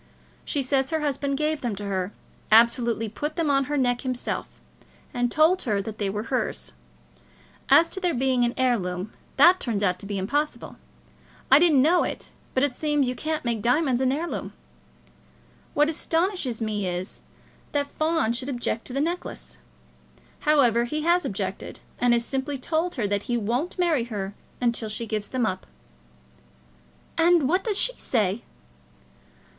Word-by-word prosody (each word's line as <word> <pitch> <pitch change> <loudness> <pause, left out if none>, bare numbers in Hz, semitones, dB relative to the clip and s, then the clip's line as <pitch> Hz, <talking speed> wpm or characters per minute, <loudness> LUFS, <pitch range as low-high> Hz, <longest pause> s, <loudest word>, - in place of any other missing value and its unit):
She 285 - -1
says 265 0 +1
her 320 -1 -1
husband 280 -1 -1
gave 305 0 -1
them 235 -5 -2
to 205 +1 -6
her, 190 -1 -2 0.4
absolutely 230 0 +4
put 295 +8 -4
them 325 -4 +1
on 275 -1 +2
her 295 +2 -2
neck 245 -2 +1
himself, 255 -2 -3 0.7
and 245 -1 0
told 325 +4 +4
her 210 -6 0
that 215 +1 -6
they 200 -2 0
were 210 +2 -3
hers. - - -1 1.0
As 335 - +7
to - - -3
their 355 -5 0
being 255 -1 +2
an 240 0 0
heirloom, 200 -7 0 0.2
that 365 +2 +7
turns 215 -4 -2
out 180 -2 +1
to 200 - -9
be 200 -1 -3
impossible. 290 +11 -2 0.8
I 270 - +9
didn't 305 -6 +5
know 345 +4 +4
it, - - -5 0.2
but 260 - +3
it 280 -3 +1
seems 295 -2 +1
you 250 - 0
can't 310 +2 -3
make 230 -3 -1
diamonds 255 +2 +2
an 260 -1 +2
heirloom. 320 +5 -3 1.2
What 295 +1 +4
astonishes 325 - -1
me 210 -3 -2
is, 180 +1 -4 0.5
that 285 -1 0
Fawn 310 -4 0
should 255 +3 -2
object 240 -3 -2
to 250 - -7
the 275 - 0
necklace. 340 +4 -4 0.8
However, 245 -6 +3
he 300 +5 -3
has 345 +2 +3
objected, - - -4 0.2
and 245 -1 +4
has 235 0 +1
simply 275 +1 -2
told 320 +6 -1
her 235 - -1
that 205 0 -1
he 240 - +2
won't 240 - -2
marry 330 -9 +2
her 205 -4 -5 0.3
unless 235 -3 0
she 220 +2 -2
gives 215 -1 -3
them 255 -3 -1
up." 185 -3 -3 1.5
"And 335 -4 +4
what 365 +6 +1
does 420 -3 -1
she - - +3
say?" 210 -2 0
255 Hz, 165 wpm, -25 LUFS, 225-305 Hz, 1.5 s, I